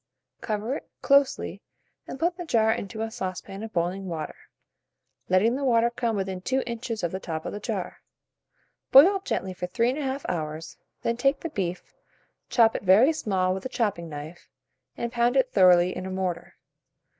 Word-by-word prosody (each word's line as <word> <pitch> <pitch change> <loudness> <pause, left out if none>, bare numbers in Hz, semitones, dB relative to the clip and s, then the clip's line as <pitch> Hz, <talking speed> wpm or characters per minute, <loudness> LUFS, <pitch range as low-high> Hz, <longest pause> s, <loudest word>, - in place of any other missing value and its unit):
Cover 220 +5 -2
it - - -13
closely, 280 -1 +2 0.5
and 265 - -7
put 345 +2 +1
the 355 - -6
jar 225 -8 +2
into 220 +1 -3
a 225 - -4
saucepan 195 -2 -5
of 220 0 -6
boiling 180 +2 -2
water, 160 -3 -4 1.0
letting 200 +6 +3
the 280 - -3
water 235 -2 +3
come 235 -2 -1
within 190 -2 -3
2 260 +7 0
inches 235 -2 -4
of 170 - 0
the 190 - -4
top 160 -4 -5
of - - -4
the 205 - -5
jar. - - -4 0.9
Boil 360 +9 +8
gently 190 - -2
for 180 0 -5
3 235 +6 +1
1/2 275 -1 -3
hours, 160 -1 -4 0.3
then 235 0 0
take 275 +2 +1
the 335 - -4
beef, 185 - -4 0.6
chop 225 -2 +4
it - - -2
very 210 - +5
small 190 -10 0
with 190 - -5
a 260 - -4
chopping 205 -9 -1
knife, 150 +3 -9 0.5
and 235 0 -3
pound 240 +2 +2
it 260 -1 +2
thoroughly 180 -1 +5
in 185 +1 -5
a - - -5
mortar. 185 -2 -3
215 Hz, 180 wpm, -26 LUFS, 185-250 Hz, 1.0 s, Boil